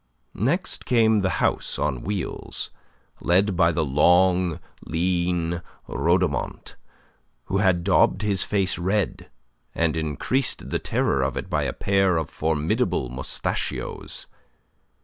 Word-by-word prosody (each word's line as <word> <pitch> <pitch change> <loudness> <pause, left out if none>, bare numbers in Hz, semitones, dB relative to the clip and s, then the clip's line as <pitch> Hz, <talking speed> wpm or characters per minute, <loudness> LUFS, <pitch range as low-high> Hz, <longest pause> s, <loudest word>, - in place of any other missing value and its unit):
Next 150 - -1
came 110 -3 +4
the 95 - +1 0.2
house - - -1
on 65 -2 -1
wheels, 100 -2 -1 0.5
led 95 +3 +2
by 85 -1 +4
the 80 -1 0
long, 90 +4 +3 0.2
lean 85 0 0 0.3
Rhodomont, - - -1 0.7
who 95 - -1
had 95 -3 +2
daubed 95 +1 +3
his 100 -3 +1
face 95 -3 0
red, 95 +2 -1 0.5
and 85 -1 +1
increased 80 - -1
the - - 0
terror 70 - 0
of 65 +1 -1
it - - -5
by - - +1
a - - -1
pair 95 -3 +2
of 80 - -3
formidable 75 -5 0
mostachios. 65 +1 -4
90 Hz, 120 wpm, -24 LUFS, 80-100 Hz, 0.7 s, came